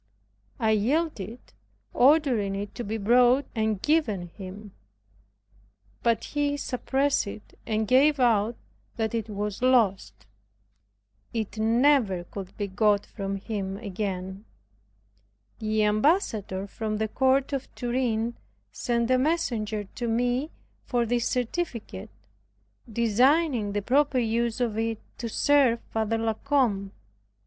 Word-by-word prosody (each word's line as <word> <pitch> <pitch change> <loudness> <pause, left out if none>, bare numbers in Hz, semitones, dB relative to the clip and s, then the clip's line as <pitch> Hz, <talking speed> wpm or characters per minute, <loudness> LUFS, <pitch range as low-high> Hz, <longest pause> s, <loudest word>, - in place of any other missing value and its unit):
I 220 -2 +2
yielded, 235 - -1 0.4
ordering 250 -8 +3
it 200 +1 -5
to 240 - -5
be 220 +1 -3
brought 245 +5 +4
and 220 -3 0
given 220 - 0
him. 195 +3 -10 1.3
But 230 -1 +1
he 290 -1 -1
suppressed 270 -1 0
it, 210 +1 -9
and 220 0 0
gave 280 +5 +4
out 230 -2 +3 0.4
that 220 -2 -2
it 225 -1 -2
was 210 0 -4
lost. 195 - +2 1.1
It 220 -1 -3
never 225 -4 +3
could 190 +1 -9
be 205 - -1
got 205 +1 +2
from 195 -2 -4
him 195 -1 -4
again. 195 -1 -5 1.1
The 215 -1 0
Ambassador 210 - +1
from 215 +1 -4
the 220 +1 0
Court 265 +4 +1
of 275 -1 -2
Turin 240 -2 -1 0.4
sent 235 0 -1
a 255 - +4
messenger 235 -9 0
to 235 +4 -6
me 245 +5 0 0.3
for 240 -2 0
this 235 +1 0
certificate, 245 - -3 0.8
designing 235 +1 +2
the 205 -1 -1
proper 275 +3 +2
use 235 0 0
of 225 -3 -1
it 225 -1 -1 0.2
to 235 - -3
serve 265 -1 +3
Father 225 0 0
La 225 0 0
Combe. 220 -7 0
225 Hz, 120 wpm, -26 LUFS, 205-255 Hz, 1.3 s, brought